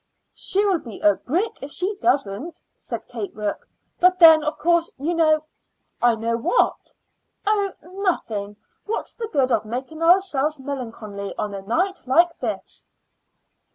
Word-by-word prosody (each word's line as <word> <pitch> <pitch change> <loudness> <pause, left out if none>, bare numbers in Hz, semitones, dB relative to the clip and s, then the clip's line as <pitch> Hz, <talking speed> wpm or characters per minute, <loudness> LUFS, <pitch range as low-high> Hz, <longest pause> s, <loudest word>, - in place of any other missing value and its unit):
"She'll 390 -2 +1
be 230 -8 -10
a 205 - +5
brick 350 - -2
if 275 - -6
she 375 +7 -2
doesn't," 285 - 0 0.2
said - - -6
Kate 395 - -6
Rourke. 210 -1 -4 0.3
"But 365 +1 +5
then, 320 -3 +8
of 300 0 -2
course, 340 +2 +2
you 300 +6 -1
know 310 -2 +3 0.3
" - - -47
"I 240 -1 +4
know 230 +1 -1
what?" 240 - 0 0.5
"Oh, 405 -2 +1
nothing. 330 - -2 0.3
What's 445 - -3
the 455 - -5
good 270 -9 +1
of - - +2
making 260 +8 -6
ourselves 330 -4 +3
melancholy 225 -7 -6
on 210 -1 -3
a 195 - -5
night 360 - -1
like 340 +6 +3
this?" - - -5
310 Hz, 150 wpm, -23 LUFS, 230-360 Hz, 0.5 s, then